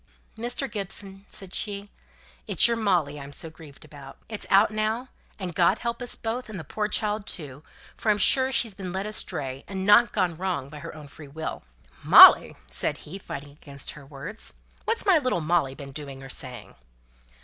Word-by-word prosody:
"Mr. 240 +4 -2
Gibson," 200 -2 -5
said 190 -2 -5
she, 200 -1 -3 0.6
"it's - - +5
your 235 - +1
Molly 175 -10 0
I'm 140 0 -9
so 160 +3 -4
grieved 155 -3 -14
about. 140 -2 -12
It's 215 -2 -5
out 200 +3 +5
now, 220 +4 -1 0.3
and 185 -4 -5
God 180 +4 +3
help 235 +1 -4
us 245 - -2
both, 230 +2 -4
and 205 -4 -6
the - - -7
poor 210 +8 -2
child 210 0 -1
too, 145 -5 -5 0.3
for 220 - -2
I'm 210 - +4
sure 260 +4 +5
she's 235 -5 +2
been 190 -2 -6
led 190 +2 -3
astray, 145 -10 -2
and 190 -1 -4
not 210 +4 +6
gone 185 -5 +1
wrong 175 -5 -3
by 150 +1 -9
her 145 - -8
own 155 -1 -10
free 145 +1 -12
will!" 160 +3 -6 0.4
"Molly!" - - +9
said 60 +1 -1
he, 185 +6 -8
fighting 145 -6 -8
against 140 -1 -7
her 150 - -12
words. 150 +10 -8 0.3
"What's 460 0 0
my 375 -5 +5
little 255 -10 0
Molly 155 -4 +1
been 140 -1 -9
doing 135 -1 -8
or 135 - -10
saying?" 125 -4 -8
185 Hz, 190 wpm, -26 LUFS, 145-215 Hz, 0.6 s, Molly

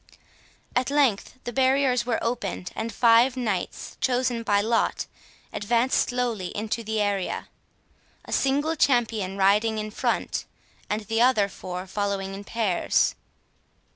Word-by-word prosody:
At 250 +1 +1
length 270 -6 +1
the 240 - -5
barriers 260 -1 +2
were 235 - +1
opened, 230 -6 -3
and 225 +1 -3
five 240 +3 +4
knights, 215 -7 -3
chosen 250 -2 +1
by 205 -3 +2
lot, 225 +3 +1 0.5
advanced 235 +5 +1
slowly 240 -7 -1
into 220 +2 -2
the 220 0 -2
area; 200 -3 -1 0.8
a - - -10
single 290 +4 +1
champion 225 - +1
riding 210 +3 +3
in 215 0 -4
front, - - -1 0.4
and 210 +1 -1
the 225 +2 -1
other 240 -5 +4
four 185 -1 -6
following 195 0 -2
in 195 +1 -7
pairs. 215 -6 +1
225 Hz, 130 wpm, -25 LUFS, 205-250 Hz, 0.8 s, five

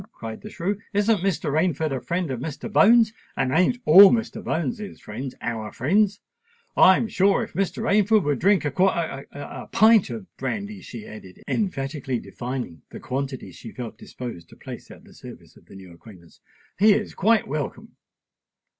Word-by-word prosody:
cried 110 -1 -8
the 215 - -9
shrew. 200 +2 -3
"Isn't 205 +1 +2
Mr. 185 -5 -1
Rainford 160 -1 0
a 130 - -4
friend 175 -4 -2
of 125 - -3
Mr. 160 - -6
Bones?—and 220 - +3
ain't 180 - +3
all 190 +5 +10
Mr. 225 0 -1
Bones's 170 +6 -3
friends 125 +5 -7
our 110 -2 -4
friends? 200 - +1 0.6
I'm 190 +4 +5
sure 200 +3 +2
if 225 - -9
Mr. 195 -1 -2
Rainford 210 0 +3
would 145 -4 0
drink 195 -2 +3
a—a 145 - 0
quar—a 145 -5 -2
pint 220 -4 +5
of 115 -5 -6
brandy," 200 +9 -4
she 115 -3 -9
added, 95 -4 -12
emphatically 135 - -2
defining 120 - -6
the - - -9
quantity 135 0 -4
she 115 - -11
felt 120 -3 -8
disposed 115 -10 -8
to - - -15
place - - -10
at - - -14
the - - -18
service - - -13
of - - -21
the - - -14
new 95 -3 -12
acquaintance, 85 -2 -16 0.4
"he 210 +1 +6
is 210 +1 -2
quite 220 +2 +2
welcome." 145 0 -5
160 Hz, 165 wpm, -24 LUFS, 125-200 Hz, 0.6 s, all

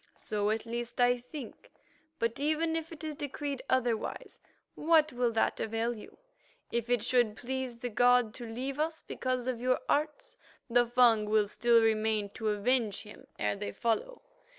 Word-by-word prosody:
So 210 -1 -1
at 220 +1 -1
least 235 +1 -4
I 245 0 +5
think: 250 0 -10 0.5
but 230 -1 -1
even 315 +3 +1
if 325 0 -3
it 320 -1 -9
is 310 -1 -3
decreed 285 -2 -4
otherwise, 240 -4 -1 0.3
what 310 -2 +3
will 245 -1 +1
that 225 - +1
avail 225 +2 -1
you? 215 - -12 0.5
If 235 0 -2
it 245 -3 +2
should 240 -3 +2
please 260 0 -4
the 245 +1 -4
god 245 0 +4
to 240 -1 -7
leave 260 +5 -4
us 320 +1 -2
because 255 -1 -2
of 250 -2 -2
your 255 0 +2
arts, 305 +12 -1 0.3
the 240 -1 +3
Fung 235 -3 +4
will 215 -1 +4
still 230 +2 +3
remain 215 -2 +1
to 220 0 -2
avenge 215 0 +1
him 210 -1 -13
ere 105 -1 0
they 100 - -5
follow. 235 - -2
245 Hz, 170 wpm, -31 LUFS, 225-265 Hz, 0.5 s, I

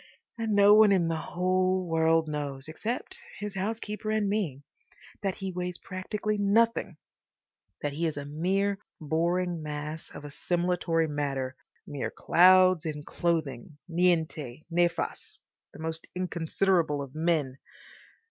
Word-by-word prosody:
And 225 -2 -1
no 205 0 +7
one 215 -1 +7
in 175 -4 +3
the 165 - 0
whole 185 +2 0
world 165 0 +3
knows—except 150 - -4 0.2
his 205 -1 -5
housekeeper 210 +2 -3
and 215 -1 +1
me—that 195 - -5
he 190 -1 -4
weighs 180 0 -4
practically 205 +4 -3
nothing; 225 +3 +2 0.9
that 145 -1 -1
he 165 +3 0
is 155 - -3
a 145 - -4
mere 195 +7 0 0.2
boring 170 +2 0
mass 150 +1 -5
of - - -10
assimilatory 170 +2 0
matter, 135 -3 -2 0.3
mere 145 -2 -4
clouds 185 -1 +5
in 150 -3 -4
clothing, 150 -5 -2
niente, 160 -6 0
nefas, 175 0 -1 0.3
the - - -13
most 160 0 -4
inconsiderable 175 -3 +1
of 140 -2 -6
men. 155 -5 0
170 Hz, 120 wpm, -28 LUFS, 150-190 Hz, 0.9 s, no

